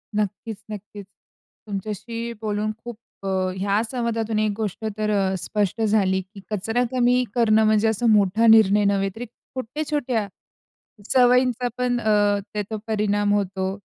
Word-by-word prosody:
नक्कीच, 210 Hz, +1 st, -2 dB
नक्कीच. 205 Hz, 0 st, -8 dB, 0.6 s
तुमच्याशी 220 Hz, +4 st, -5 dB
बोलून 215 Hz, 0 st, -1 dB
खूप 240 Hz, -2 st, -7 dB, 0.3 s
अ 195 Hz, -, -4 dB, 0.3 s
ह्या 200 Hz, +2 st, +1 dB
संवादातून 230 Hz, -3 st, -1 dB
एक 215 Hz, -1 st, +1 dB
गोष्ट 220 Hz, -1 st, -4 dB
तर 215 Hz, 0 st, -1 dB
अ, 195 Hz, -2 st, +1 dB
स्पष्ट 210 Hz, +3 st, -1 dB
झाली, 200 Hz, -3 st, +2 dB
की 195 Hz, +2 st, -14 dB
कचरा 225 Hz, +4 st, 0 dB
कमी 250 Hz, 0 st, +3 dB
करणं 220 Hz, -2 st, +4 dB
म्हणजे 215 Hz, 0 st, +3 dB
असा 220 Hz, +2 st, 0 dB
मोठा 210 Hz, +2 st, +4 dB
निर्णय 210 Hz, -2 st, +6 dB
नव्हे, 195 Hz, -1 st, +1 dB
तर 230 Hz, -, -6 dB, 0.3 s
छोट्या-छोट्या 260 Hz, -3 st, -2 dB, 0.9 s
सवयींचा 250 Hz, -1 st, +4 dB
पण 245 Hz, -1 st, 0 dB
अ, 205 Hz, -2 st, +2 dB
त्याचा 210 Hz, +1 st, -3 dB
परिणाम 205 Hz, -1 st, +1 dB
होतो. 190 Hz, -2 st, -1 dB
215 Hz, 135 wpm, -23 LUFS, 205-230 Hz, 0.9 s, निर्णय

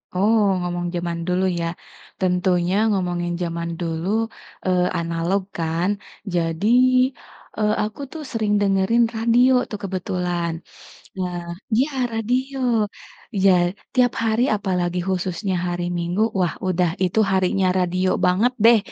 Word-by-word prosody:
Oh, 215 Hz, +4 st, +3 dB, 0.2 s
ngomong 175 Hz, 0 st, -3 dB
jaman 170 Hz, -1 st, -2 dB
dulu, 180 Hz, +1 st, +1 dB, 0.2 s
ya? 170 Hz, -, -1 dB, 0.5 s
Tentunya, 180 Hz, 0 st, +1 dB, 0.2 s
ngomongin 175 Hz, -3 st, -1 dB
jaman 170 Hz, -1 st, -3 dB
dulu, 165 Hz, 0 st, -3 dB, 0.6 s
eee, 180 Hz, -1 st, +2 dB, 0.2 s
analog, 170 Hz, +3 st, 0 dB, 0.2 s
kan. 165 Hz, +2 st, 0 dB, 0.5 s
Jadi, 165 Hz, +3 st, 0 dB, 0.9 s
eee, 210 Hz, 0 st, +2 dB
aku 215 Hz, +6 st, -5 dB
tuh, 320 Hz, -, -7 dB
sering 215 Hz, -3 st, 0 dB
dengerin 200 Hz, +4 st, +3 dB
radio 235 Hz, +3 st, +4 dB, 0.2 s
tuh, 210 Hz, -, -5 dB
kebetulan. 180 Hz, -2 st, -2 dB, 0.7 s
Nah 180 Hz, -1 st, -2 dB, 0.4 s
iya 260 Hz, +6 st, +2 dB, 0.2 s
radio, 250 Hz, +5 st, -1 dB, 0.9 s
ja 195 Hz, -, +7 dB, 0.4 s
tiap 250 Hz, -2 st, +4 dB
hari, 225 Hz, +1 st, +1 dB
apalagi 180 Hz, -3 st, -1 dB
khususnya 185 Hz, +1 st, -1 dB
hari 175 Hz, 0 st, -2 dB
Minggu. 175 Hz, +4 st, -1 dB, 0.2 s
Wah, 175 Hz, -3 st, +1 dB
udah, 180 Hz, -1 st, +2 dB
itu 185 Hz, +4 st, +1 dB
harinya 190 Hz, 0 st, +2 dB
radio 185 Hz, +1 st, +1 dB, 0.2 s
banget 200 Hz, +8 st, +3 dB
deh. 235 Hz, 0 st, +8 dB
185 Hz, 120 wpm, -22 LUFS, 175-210 Hz, 0.9 s, deh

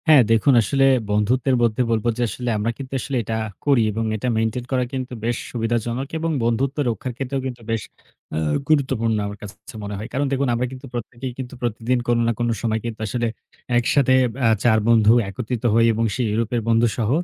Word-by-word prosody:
হ্যাঁ 155 Hz, -4 st, +8 dB
দেখুন 115 Hz, +5 st, +4 dB
আসলে 135 Hz, +6 st, +2 dB, 0.2 s
বন্ধুত্বের 120 Hz, +6 st, +2 dB
মধ্যে 115 Hz, +1 st, +2 dB
বলব 110 Hz, -1 st, 0 dB
যে -, -, -2 dB
আসলে 125 Hz, +1 st, -4 dB
আমরা 105 Hz, +3 st, 0 dB
কিন্তু 135 Hz, -1 st, -8 dB
আসলে 135 Hz, +1 st, -3 dB
এটা 110 Hz, +2 st, -3 dB, 0.3 s
করি 140 Hz, -5 st, +4 dB
এবং 110 Hz, +2 st, -2 dB
এটা 110 Hz, +4 st, -3 dB
মেইনটেইন 115 Hz, +2 st, -1 dB
করা 130 Hz, -1 st, +2 dB
কিন্তু 130 Hz, -1 st, -4 dB
বেশ 120 Hz, 0 st, 0 dB
সুবিধাজনক 120 Hz, +2 st, -1 dB
এবং 165 Hz, 0 st, -1 dB
বন্ধুত্ব 125 Hz, +5 st, 0 dB
রক্ষার 120 Hz, +3 st, -3 dB
ক্ষেত্রেও 135 Hz, 0 st, -2 dB
কিন্তু 125 Hz, -2 st, -5 dB
বেশ 115 Hz, -1 st, 0 dB, 0.5 s
অ্যা 80 Hz, -, -2 dB, 0.3 s
গুরুত্বপূর্ণ 130 Hz, -7 st, +2 dB
আমার 100 Hz, 0 st, -7 dB
কাছে, 100 Hz, -1 st, -9 dB
কাছে 105 Hz, -, -12 dB
মনে 100 Hz, 0 st, -4 dB
হয়। 105 Hz, +3 st, -6 dB
কারণ 140 Hz, +2 st, +1 dB
দেখুন 135 Hz, 0 st, +1 dB
আমরা 120 Hz, +2 st, 0 dB
কিন্তু 130 Hz, +1 st, -9 dB
প্রত্যেকেই 120 Hz, +2 st, -5 dB
কিন্তু 130 Hz, -1 st, -6 dB
প্রতিদিন 120 Hz, +1 st, 0 dB
কোনো 120 Hz, 0 st, +2 dB
না -, -, +3 dB
কোনো 120 Hz, 0 st, +1 dB
সময় 110 Hz, -2 st, 0 dB
কিন্তু 115 Hz, -1 st, -5 dB
আসলে 120 Hz, +3 st, -1 dB, 0.5 s
একসাথে 130 Hz, +2 st, +3 dB, 0.3 s
অ্যা 115 Hz, -, +4 dB
৪ 110 Hz, -2 st, +5 dB
বন্ধু 110 Hz, -2 st, +5 dB, 0.2 s
একত্রিত 110 Hz, +4 st, -4 dB
হই 115 Hz, +1 st, +5 dB
এবং 115 Hz, +1 st, 0 dB
সেই 125 Hz, -, 0 dB
ইউরোপের 115 Hz, +2 st, 0 dB
বন্ধুসহ। 115 Hz, -1 st, +2 dB
120 Hz, 195 wpm, -22 LUFS, 110-130 Hz, 0.5 s, হ্যাঁ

